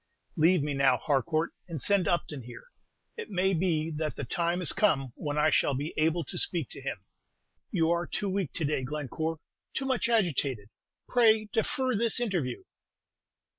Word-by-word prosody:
"Leave 170 -1 +4
me 145 -1 -1
now, 135 -2 +4
Harcourt, 155 +4 0 0.2
and 165 -4 -5
send 195 +3 +2
Upton 150 -4 -1
here. 120 +1 -10 0.5
It 455 - -6
may 190 -1 +1
be 165 -2 0
that 155 -1 -2
the - - -4
time 170 +7 0
is 180 - +2
come 135 - +2
when 145 -1 -3
I 155 +1 +4
shall 140 - +2
be 145 +4 -3
able 160 +2 +1
to - - -5
speak 165 -8 0
to - - -9
him." - - -5 0.6
"You 165 0 +2
are 170 0 0
too 205 - -2
weak 190 -5 -1
to 165 - -1
day, 145 -2 0
Glencore, 150 +4 -3 0.4
too 270 - -1
much 260 -3 0
agitated. 140 - +1 0.4
Pray 220 -3 +4
defer 255 +3 0
this 230 +2 +1
interview." 175 - -2
165 Hz, 170 wpm, -29 LUFS, 145-190 Hz, 0.6 s, Leave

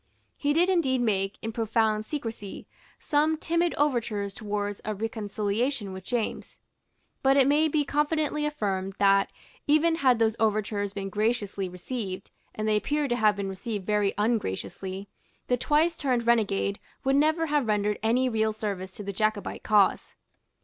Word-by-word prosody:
He 290 - 0
did 335 +4 +3
indeed 320 -9 +2
make, 195 -4 0
in 225 - -2
profound 220 -1 +1
secresy, 225 -8 -5 0.3
some 310 +1 +1
timid 335 +2 0
overtures 230 -8 0
towards 205 -1 -3
a 215 0 -3
reconciliation 215 +1 -2
with 190 -1 -8
James. 235 +2 -3 0.6
But 270 +1 +4
it 270 - +6
may 295 +3 +4
be 300 -1 +1
confidently 300 +1 0
affirmed 195 -9 -2
that, 195 0 +4 0.4
even 315 +3 +4
had 260 -6 +4
those 225 -1 +2
overtures 210 -2 0
been 195 -1 -5
graciously 205 -2 -1
received, 185 +1 -5 0.2
and 215 0 -2
they 215 -1 +3
appear 290 +7 0
to 240 - +1
have 215 -3 +3
been 200 -1 -3
received 195 +1 -5
very 210 -1 +1
ungraciously, 195 - -2 0.4
the 250 - +2
twice 305 +6 +2
turned 255 -6 0
renegade 205 -4 +1 0.2
would 270 0 +2
never 310 +3 +3
have 295 -5 +1
rendered 210 -1 +1
any 245 +4 +2
real 220 -2 +1
service 195 -3 -4
to 205 - -8
the 200 0 -4
Jacobite 215 +1 -1
cause. 210 -3 +2
220 Hz, 155 wpm, -27 LUFS, 205-280 Hz, 0.6 s, it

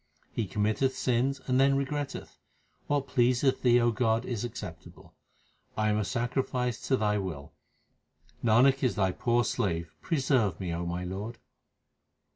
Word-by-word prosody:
He 110 - -2
committeth 110 +7 0
sins 130 +2 0
and 130 0 +2
then 135 0 +4
regretteth. 140 0 -4 0.5
What 145 -1 +1
pleaseth 125 +1 +2
Thee, 120 -1 +5
O 120 0 +3
God, 115 0 +1
is 120 -4 -3
acceptable. 120 - -8 0.6
I 110 0 +2
am 105 0 +1
a - - +1
sacrifice 125 +3 -1
to 130 - +3
Thy 105 -2 +1
will, 80 -6 -6 0.9
Nanak 125 +4 +4
is 125 - +1
Thy 95 -2 +2
poor 120 +5 +1
slave; 85 -9 -2
Preserve 130 - +1
me, 90 -3 -3
O 85 +1 -3
my 90 +1 -3
Lord 100 +6 -5
120 Hz, 145 wpm, -29 LUFS, 105-130 Hz, 0.9 s, Thee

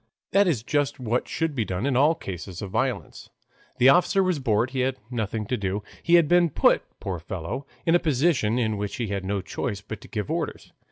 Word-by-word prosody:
That 200 0 +4
is 130 -11 0
just 145 +1 0
what 120 0 -1
should 165 -2 -1
be 120 -5 0
done 95 +2 -3
in 140 -2 +1
all 150 +6 +4
cases 90 - -7
of 100 - -6
violence. 130 +4 -2 0.5
The 130 - +6
officer 180 +5 +4
was 180 -5 0
bored, 120 -1 +1
he 130 - -3
had 130 +1 0
nothing 110 -2 -2
to 125 +4 -1
do. 100 +1 -2 0.2
He 170 - +4
had 170 -3 +5
been 175 +1 +4
put, - - +3 0.2
poor 95 -3 -4
fellow, 85 - -5 0.2
in 165 - +3
a 175 - +6
position 140 -7 +2
in 110 -3 0
which 105 0 -3
he 115 -4 -3
had 100 -1 -2
no 100 +1 -1
choice 100 +2 -4
but 110 +1 -8
to - - -12
give 105 -6 -4
orders. - - -4
120 Hz, 220 wpm, -25 LUFS, 100-145 Hz, 0.5 s, The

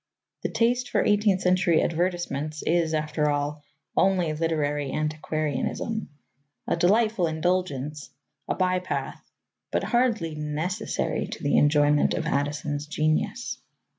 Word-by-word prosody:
The - - -2
taste 245 +2 +1
for - - +1
eighteenth 205 -2 +3
century 180 -2 +3
advertisements 165 -3 -2
is, 165 -1 +1
after 150 0 0
all, 145 +1 -1 0.3
only 185 -5 +2
literary 150 -3 -1
antiquarianism 155 - -2 0.6
a - - +1
delightful 200 +2 +3
indulgence, 155 -3 -1 0.4
a - - 0
by 185 -1 +1
path, 180 - -4 0.5
but - - 0
hardly 235 -10 +1
necessary 155 +7 -2
to - - -8
the 145 - +2
enjoyment 145 0 +4
of 160 - -2
Addison's 145 0 -1
genius. 155 +10 -1
160 Hz, 115 wpm, -26 LUFS, 150-185 Hz, 0.6 s, enjoyment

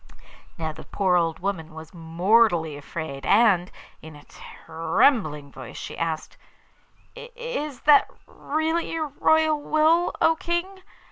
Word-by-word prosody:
Now 160 -1 -3
the 155 - -11
poor 190 -3 0
old 165 -2 +1
woman 170 -5 -4
was 160 +1 -11
mortally 170 0 +2
afraid 145 -1 -7
and, 195 - +3 0.3
in 160 -1 -12
a 145 - -14
trembling 160 - -1
voice 130 -3 -10
she - - -7
asked: 165 -1 -4 0.8
'Is 475 - -6
that 295 -1 +5 0.2
really 320 +3 -2
your 315 -2 -3
royal 315 -1 +3
will, 315 +4 +2
O 325 - +3
King? 350 +4 -3
195 Hz, 125 wpm, -24 LUFS, -, 0.8 s, that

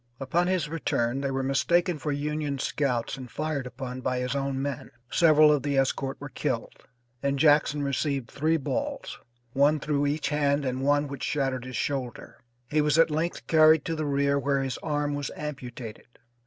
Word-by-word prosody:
Upon 165 +7 +1
his 185 -4 0
return 135 -5 -1
they 140 - -1
were 135 0 -1
mistaken 170 +5 +1
for 150 +1 -2
Union 145 0 -2
scouts 130 -3 -1
and 130 -2 -8
fired 150 -3 -3
upon 130 0 -6
by 125 - -1
his 125 +1 -2
own 135 -1 -1
men. 140 -1 -4 0.2
Several 155 -3 +6
of 145 -2 +2
the 140 0 -1
escort 135 0 0
were - - -7
killed, - - -3 0.5
and 140 0 0
Jackson 145 0 +4
received 140 -2 -1
three 160 +3 +1
balls, 285 - -4 0.3
one 145 +3 +3
through 145 -1 0
each 150 +2 -1
hand 145 -1 +1
and 130 0 -2
one 145 +1 +2
which 140 -2 -7
shattered 135 -3 -1
his 130 -3 -5
shoulder. 130 -2 -4 0.3
He 150 +4 +2
was 150 +1 +2
at 165 -1 +5
length 160 +3 -2
carried 155 -1 +5
to 165 - -2
the 155 -1 -2
rear 140 0 +2
where 140 -1 0
his 130 -2 -3
arm 145 -1 -1
was 145 -1 -3
amputated. 125 -6 -7
140 Hz, 180 wpm, -27 LUFS, 135-150 Hz, 0.5 s, Several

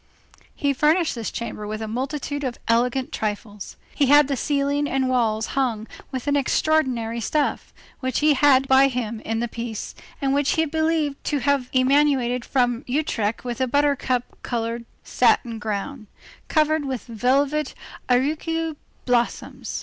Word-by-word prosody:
He 285 -2 +1
furnished 310 +5 +2
this 230 -3 -4
chamber 210 -2 -5
with 215 0 -4
a 220 - -4
multitude 280 +5 -3
of 255 -3 -3
elegant 245 +3 +1
trifles. 210 -1 -5 0.2
He 280 - +2
had 290 +1 +6
the 280 - -1
ceiling 285 +2 0
and 265 -1 0
walls 225 -3 +1
hung 240 -6 0 0.3
with 260 -2 -4
an 285 0 +1
extraordinary 260 -5 +1
stuff, 295 +5 -1 0.3
which 260 -2 -2
he 300 0 +4
had 270 -1 +4
by 265 +1 +6
him 235 -4 -3
in 225 +1 -3
the 240 - -1
piece, 230 -1 -6 0.3
and 275 -2 0
which 285 0 +2
he 320 - +2
believed 315 -2 0
to 295 - 0
have 280 -2 +1
emanated 255 -2 +3
from 245 -2 0
Utrecht 245 -6 -1
with 245 +1 -3
a 260 - +2
buttercup 275 -2 +1 0.2
colored 235 0 -3 0.2
satin 230 -3 +2
ground, 215 +3 -4 0.4
covered 310 0 +2
with 265 -4 -4
velvet 270 +5 0 0.3
auricula 310 +5 0 0.3
blossoms. 240 -2 -1
260 Hz, 150 wpm, -23 LUFS, 235-290 Hz, 0.4 s, had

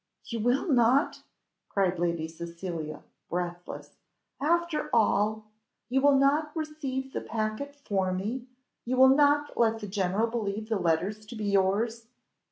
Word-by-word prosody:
You 230 - -4
will 245 - +1
not!" 260 +1 +3 0.5
cried 185 -3 +1
Lady 170 -2 0
Cecilia, 170 -2 -6 0.3
breathless. 175 0 -5 0.4
"After 340 +1 +1
all! 215 -1 +2 0.4
You 265 +2 +2
will 285 0 +5
not 290 +3 +3
receive 280 -4 -4
the - - -2
packet 220 +6 -3
for 195 -9 -1
me! 220 +8 -3 0.4
you 255 +2 -1
will 260 0 +8
not 290 +1 +3
let 225 -1 +3
the 210 -2 -7
general 195 +2 0
believe 220 -2 -3
the 220 -3 +1
letters 180 +5 0
to 235 - -8
be 215 -1 -4
yours! 205 +4 +1
220 Hz, 140 wpm, -28 LUFS, 190-265 Hz, 0.5 s, will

